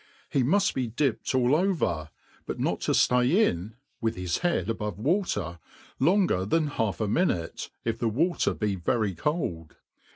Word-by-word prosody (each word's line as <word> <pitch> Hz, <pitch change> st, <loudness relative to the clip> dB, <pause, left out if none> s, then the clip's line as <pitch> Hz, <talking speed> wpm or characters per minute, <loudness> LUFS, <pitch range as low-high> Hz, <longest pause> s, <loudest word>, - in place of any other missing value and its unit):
He 135 Hz, -, +2 dB
mud 185 Hz, +11 st, +3 dB
be 130 Hz, -2 st, -1 dB
dipped 130 Hz, +2 st, -1 dB
all 130 Hz, +2 st, +4 dB
over, 155 Hz, -, 0 dB, 0.4 s
but -, -, -4 dB
not -, -, 0 dB
to -, -, 0 dB
ftay 125 Hz, +1 st, +3 dB
in 110 Hz, -, +1 dB, 0.3 s
(with 115 Hz, -1 st, 0 dB
his 90 Hz, -2 st, -2 dB
head 170 Hz, -, 0 dB
above 105 Hz, -4 st, -3 dB
water) 105 Hz, -, -1 dB, 0.4 s
longer 175 Hz, -, +3 dB
than 155 Hz, +11 st, +1 dB
half 115 Hz, -9 st, -1 dB
a 110 Hz, -, 0 dB
minute, 100 Hz, -, 0 dB, 0.2 s
if 115 Hz, 0 st, -1 dB
the 115 Hz, -, +1 dB
water 165 Hz, -, +1 dB
be 105 Hz, -2 st, -1 dB
very 100 Hz, +3 st, 0 dB
cold. 85 Hz, -, -3 dB
115 Hz, 160 wpm, -27 LUFS, 95-155 Hz, 0.4 s, all